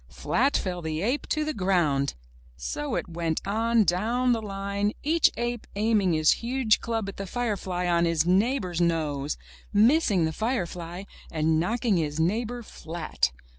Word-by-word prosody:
Flat 250 - +1
fell 180 -2 -3
the 160 +1 -3
ape 250 +7 -1
to 310 0 0
the 310 - -2
ground! 170 -8 +1 0.4
So 65 - -3
it - - -2
went 165 -2 -2
on 225 +3 +2
down 225 +8 +1
the 230 -2 +1
line, 200 0 -2
each 320 +2 +4
ape 240 -1 -3
aiming 205 -4 +2
his 155 -1 +4
huge 235 -2 +2
club 225 -3 -2
at 195 - -7
the 195 - -5
firefly 195 -6 -2
on 170 -1 +3
his 165 -2 +2
neighbor's 185 -1 +1
nose, 150 -4 0 0.3
missing 215 - +4
the 160 - -2
firefly, 180 -6 -3 0.3
and 155 0 +1
knocking 220 +3 +1
his 155 -2 -2
neighbor 230 +8 0
flat. 160 - -2
195 Hz, 155 wpm, -26 LUFS, 165-230 Hz, 0.4 s, each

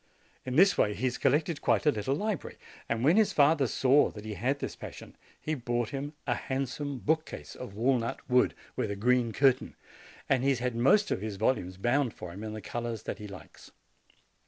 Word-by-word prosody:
In 130 - -2
this 195 +5 +5
way 105 -1 +2
he 115 - -7
has 125 -1 -1
collected 150 +3 +1
quite - - +2
a 150 - +6
little 110 +4 -1
library; 210 +2 -3 0.3
and 115 +1 -1
when 160 +8 +5
his 220 -2 +3
father 145 -1 +4
saw 135 +4 +4
that 105 0 -10
he 110 - -4
had 125 +8 -1
this - - -5
passion, - - -10 0.2
he 155 - -3
bought 120 -4 -2
him 140 +3 -5
a - - +1
handsome 135 +1 -3
bookcase 155 +5 -2
of 120 -6 -9
walnut 120 +1 0
wood, 125 0 +3 0.2
with - - -1
a 100 - -2
green 120 +2 +2
cur 135 +3 +5
tain, 125 - -12 0.5
and 135 -2 +2
he 135 - +2
has 135 - +2
had 125 0 -2
most 135 - +4
of - - -1
his 105 -1 -4
volumes 95 -4 0
bound 120 +4 +1
for 85 -1 -8
him 100 +4 -8
in 110 -1 -5
the 110 - -6
colors 115 0 -4
that - - -5
he 105 - -7
likes. 100 -2 -12
125 Hz, 210 wpm, -29 LUFS, 110-140 Hz, 0.5 s, a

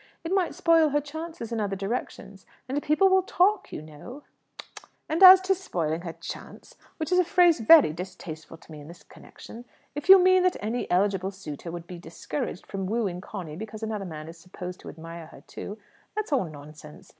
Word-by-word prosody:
It 335 +3 -3
might 380 -3 0
spoil 330 -2 +4
her 295 +1 +1
chance 315 +3 -8
in 230 0 -4
other 200 -2 -2
directions; 195 -1 -6 0.2
and 275 +3 -2
people 310 +7 +3
will 380 0 +4
talk, 380 +2 +1
you - - -7
know." 155 - -11 0.3
"Tut, - - -13 0.2
tut! 320 +4 -2
As 375 0 +11
to 380 +1 +2
'spoiling 170 - -3
her 170 -2 -6
chance' 165 +1 -10 0.2
which 320 +1 -4
is 365 - +4
a - - +5
phrase 350 -2 +4
very 250 - +7
distasteful 170 -2 -9
to 165 - -19
me 155 - -9
in 145 - -12
this 170 +2 -13
connection 235 +2 -13 0.3
if 295 +5 -7
you 385 - +12
mean 370 0 +4
that 365 0 +1
any 225 +4 -3
eligible 190 +1 +1
suitor 175 -5 -8
would 170 0 -7
be 175 0 -9
discouraged 165 0 -6
from 195 -1 -5
wooing 200 -5 -2
Conny 180 -7 -8
because 215 +3 -8
another 215 -2 -3
man 155 -3 -8
is 165 +1 -11
supposed 180 +1 -9
to - - -10
admire 165 0 -10
her 160 - -15
too, 205 - -9 0.4
that's 430 -7 -3
all 260 -9 +2
nonsense. 150 0 -13
205 Hz, 200 wpm, -26 LUFS, -, 0.4 s, you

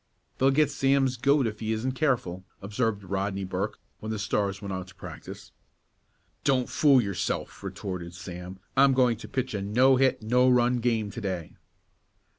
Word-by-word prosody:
"They'll 135 - +5
get 145 +1 +3
Sam's 135 -1 +2
goat 140 +2 +3
if 110 -1 -3
he 110 0 -2
isn't 115 +4 -1
careful," 125 - -1 0.2
observed 105 +1 -2
Rodney 100 +1 -2
Burke, 95 +3 -3 0.2
when 110 - -6
the 110 - -2
Stars 100 -1 -1
went 100 -2 -5
out 95 0 -5
to 95 - -15
practice. - - -10 0.9
"Don't 135 -2 +3
you - - -6
fool 140 -4 +5
yourself," 100 -4 -3
retorted 90 -3 -6
Sam. 90 +1 -8 0.2
"I'm 135 0 +6
going 125 -3 +3
to - - -9
pitch 130 -2 -2
a 100 - -2
no 125 +7 +4
hit 130 -3 +2
no 125 +3 +4
run 125 0 +3
game 115 -3 0
to 120 - -7
day." 95 -5 -4
110 Hz, 175 wpm, -27 LUFS, 100-130 Hz, 0.9 s, I'm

